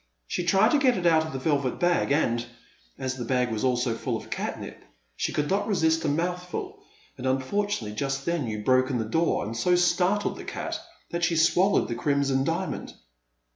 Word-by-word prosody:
She 175 - -2
tried 195 +6 +4
to 295 - +4
get 255 -4 +3
it 180 - -3
out 160 -2 +4
of - - -7
the 135 - -4
velvet 140 -2 0
bag, 175 -4 +2
and, 120 -5 +2 0.5
as 130 0 -3
the 125 - -4
bag 125 0 0
was 110 -1 -2
also 125 -2 +1
full 115 - -2
of - - -12
catnip, - - -5 0.3
she - - -1
could 150 0 -1
not 195 +4 0
resist 160 -5 +2
a - - 0
mouthful, 180 - -3 0.4
and 130 - -3
unfortunately 130 - -1
just 135 +2 -2
then 170 -6 -1
you 105 -1 -4
broke 130 +2 +3
in 130 - 0
the 110 - -1
door 165 +5 +1
and 110 +2 -5
so 180 +10 +2
startled 180 +3 +2
the - - -8
cat - - -4 0.3
that 170 0 -2
she 170 -1 +2
swallowed 180 +4 +3
the - - -3
Crimson 140 +1 +1
Diamond." - - -3
150 Hz, 200 wpm, -26 LUFS, 130-180 Hz, 0.5 s, tried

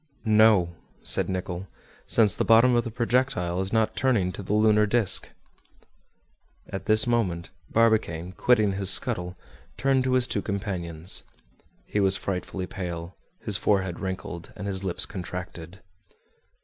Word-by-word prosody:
"No," 105 -5 +4 0.3
said - - +1
Nicholl, 95 0 -4 0.4
"since 105 -4 +3
the - - 0
bottom 115 +2 +5
of 120 -1 +3
the 115 - -5
projectile 115 -7 0
is 95 - -4
not 110 -1 +1
turning 115 -9 +1
to 100 - -8
the 100 +2 -2
lunar 105 0 +4
disc!" 105 -3 +1 1.4
At 95 0 -6
this 110 0 +3
moment, 95 -8 -1 0.2
Barbicane, 105 -7 +1
quitting 105 +1 +2
his 95 0 0
scuttle, 90 -1 +1 0.4
turned 135 -1 +2
to 130 - +1
his 130 -1 +3
two 100 - -2
companions. 90 -4 -1 0.6
He 105 - -2
was 95 -1 +2
frightfully 95 -1 -4
pale, 85 -2 -6 0.3
his 105 -4 +1
forehead 95 -4 0
wrinkled, 95 -3 -6
and 100 - -7
his 95 -1 -3
lips 95 +1 -1
contracted. 90 -3 -8
100 Hz, 140 wpm, -26 LUFS, 90-110 Hz, 1.4 s, bottom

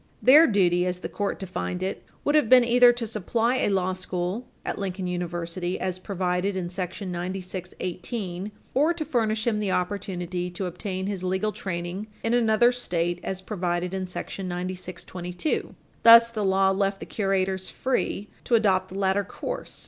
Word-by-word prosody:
Their 300 +6 +8
duty, 180 -4 +3
as 180 0 -3
the - - -4
court 205 -1 -2
defined 185 -1 -4
it, 190 - -3 0.2
would 290 - +2
have 300 -7 +4
been 255 -1 +8
either 245 +1 +6
to 240 -1 -3
supply 225 +3 0
a - - +1
law 185 -1 +1
school 185 +5 -3 0.2
at - - -3
Lincoln 190 -1 -3
University 175 0 -3
as 185 -1 -2
provided 185 0 -1
in 180 -2 -2
§ 185 +2 -4
9618 185 +2 -4 0.2
or 305 +6 +3
to 315 -2 -3
furnish 220 -6 0
him 220 -3 +1
the 205 -2 -1
opportunity 180 -2 -2
to 180 +2 -4
obtain 185 +1 -4
his 195 -2 -3
legal 190 +3 0
training 185 +1 -4 0.2
in 225 - +1
another 240 0 +4
State, 175 -8 -2
as 190 0 -4
provided 180 -2 -2
in 190 -1 -2
§ 185 +1 -5
9622 180 - -4 0.3
Thus, 230 0 +9
the 215 -2 -2
law 190 0 +4
left 195 0 0
the - - -7
curators 190 -2 -1
free 250 -5 -1 0.2
to 240 - +3
adopt 200 -4 +2
the 190 - -7
latter 195 +1 +2
course. - - -6
190 Hz, 165 wpm, -26 LUFS, 180-215 Hz, 0.3 s, Thus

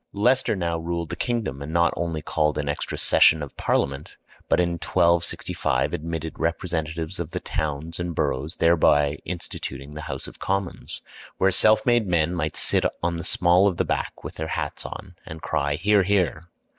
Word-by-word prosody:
Leicester 125 +4 +2
now 85 -3 -1
ruled 85 0 -3
the - - -4
kingdom, 110 - -2
and 70 +2 -6
not 85 +1 +3
only 80 -3 -3
called 75 -1 0
an 75 -1 -2
extra 70 - -3
session 80 -1 +5
of 70 - -9
Parliament, 70 +2 -1 0.3
but - - +3
in 85 -1 +2
1265 85 -8 +1
admitted 80 0 -4
representatives 80 0 -2
of 85 -3 -3
the - - -4
towns 80 +2 -3
and 85 -1 -3
boroughs, 75 +6 -1
thereby 75 -3 +3
instituting 75 -5 -6
the 75 - -6
House - - -4
of - - -11
Commons, 95 -2 -3 0.3
where 95 +1 +3
self 110 +6 +5
made 120 -4 +3
men 85 -1 +1
might 80 -3 -2
sit - - +2 0.2
on 85 0 0
the 85 - -5
small 90 +1 +4
of 90 -4 -1
the - - +1
back - - -3
with - - -8
their 80 - -3
hats - - -3
on - - -9
and 80 0 -10
cry 70 +1 0
"Hear! 100 +6 +3
Hear!" 90 -4 0
85 Hz, 180 wpm, -24 LUFS, 75-90 Hz, 0.3 s, session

